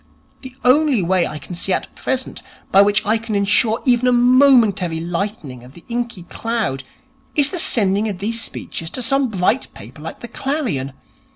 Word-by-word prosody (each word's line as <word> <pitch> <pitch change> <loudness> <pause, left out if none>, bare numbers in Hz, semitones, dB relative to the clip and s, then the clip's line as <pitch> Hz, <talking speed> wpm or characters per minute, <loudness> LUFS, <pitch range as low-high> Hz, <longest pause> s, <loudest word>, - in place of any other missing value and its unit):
The 260 -1 -10
only 265 - +4
way 180 0 +1
I 155 - -6
can 150 +5 -9
see 180 +2 -3
at - - -4
present 260 0 -3 0.3
by 195 - +7
which 205 +2 +2
I 220 +2 +1
can 220 -1 -4
ensure 210 +3 +2
even 250 -1 +3
a - - +4
momentary 240 -9 +4
lightening 170 - -4
of 125 +3 -15
the 170 - -15
inky 235 -5 -3
cloud 215 - -3 0.5
is 290 -1 +3
the 360 - -3
sending 210 -6 +2
of 195 - -4
these 225 +4 -3
speeches 165 -6 -5
to 255 - -4
some 270 +2 +2
bright 210 +5 0
paper 120 +9 -12
like 160 - -8
the 240 - -7
_Clarion. 235 - -3
215 Hz, 180 wpm, -19 LUFS, 180-245 Hz, 0.5 s, by